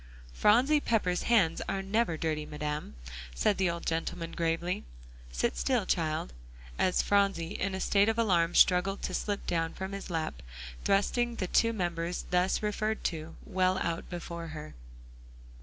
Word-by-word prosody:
"Phronsie 250 - +4
Pepper's 200 -9 +1
hands 190 -9 +3
are 195 0 -1
never 195 -4 +1
dirty, 155 -2 -1
Madam," 150 - -4 0.4
said 195 - +1
the 190 -2 +3
old 170 0 -4
gentleman 165 +1 -2
gravely. 170 +2 -1 0.5
"Sit - - 0
still, - - +1
child," 155 - -1 0.5
as 185 - +2
Phronsie 195 -4 +2
in 195 -1 -2
a - - -3
state 200 +2 +3
of 225 - 0
alarm 175 -7 +2
struggled 195 +2 +4
to 185 - -2
slip 205 +2 -2
down 165 -1 -1
from 190 +1 -5
his 195 -1 -6
lap, 160 - -3 0.4
thrusting 235 +4 +2
the 190 - -2
two 230 +5 +3
members 175 -4 -2
thus 180 +3 +2
referred 215 +1 -1
to, 160 -1 -3
well 185 -2 +1
out 170 -2 -2
before 170 -1 -6
her. 155 -1 -8
180 Hz, 155 wpm, -30 LUFS, 165-200 Hz, 0.5 s, Phronsie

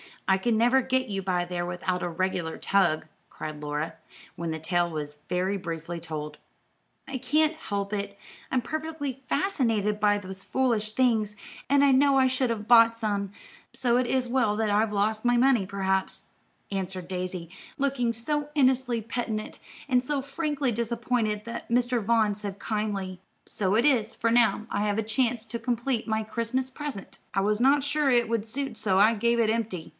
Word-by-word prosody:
I 190 0 +3
never 240 +4 +4
can - - -11
get 260 -1 +1
you 195 -1 -2
by 180 -2 0
there 175 0 -3
without 180 +1 -2
a - - -1
regular 175 -1 -2
tug," 175 -6 +2 0.2
cried 155 -1 -7
Laura, 150 +2 -3 0.4
when 170 -1 -3
the 160 - -3
tale 175 +2 +1
was 150 -2 -5
very 185 +2 0
briefly 170 -2 -5
told. 150 -2 -6 0.7
"I 270 -1 -4
can't 305 +5 +2
help 200 -10 -4
it; 200 -1 -3 0.3
I'm 255 - +1
perfectly 305 -2 -4
fascinated 225 - +1
by 205 -1 +3
those 190 -1 -8
foolish 230 -5 0
things, 220 -5 +2 0.3
and 280 0 +5
I 280 - +6
know 275 +1 +5
I 260 -1 +5
should 255 -1 0
have 215 -2 -2
bought 230 -1 +7
some; 205 -3 -2 0.4
so 245 -1 +2
it 250 -1 +1
is 255 -1 0
well 235 -5 +2
that 220 0 0
I've 210 +1 +2
lost 215 +2 0
my 245 0 +4
money, 245 -4 +4
perhaps," 190 -1 -1 0.4
answered 185 -2 -4
Daisy, 180 -2 -4 0.3
looking 270 -4 0
so 295 +6 -2
innocently 255 -4 +2
penitent 225 -1 -4 0.3
and 250 -1 +4
so 275 +2 -1
frankly 280 -1 -1
disappointed 230 -2 -1
that 235 - -6
Mr. 245 0 +2
Vaughn 220 -1 +2
said 200 -1 -6
kindly: 200 -4 -3 0.3
"So 195 -1 0
it 235 +4 +3
is, 235 -6 +2
for 230 0 0
now 230 -2 +3
I 205 - 0
have 205 0 0
a 220 - +1
chance 230 +1 0
to 235 +1 -4
complete 240 0 -1
my 220 0 0
Christmas 235 +4 -2
present. 280 -8 -7 0.2
I 195 - +3
was 210 +2 +1
not 275 +3 +4
sure 295 0 +1
it 240 -3 +3
would 230 -2 0
suit 250 +1 -4
so 205 -3 +1
I 210 +4 +6
gave 235 +2 +1
it 230 -2 +3
empty. 220 -7 -2
220 Hz, 180 wpm, -27 LUFS, 195-255 Hz, 0.7 s, bought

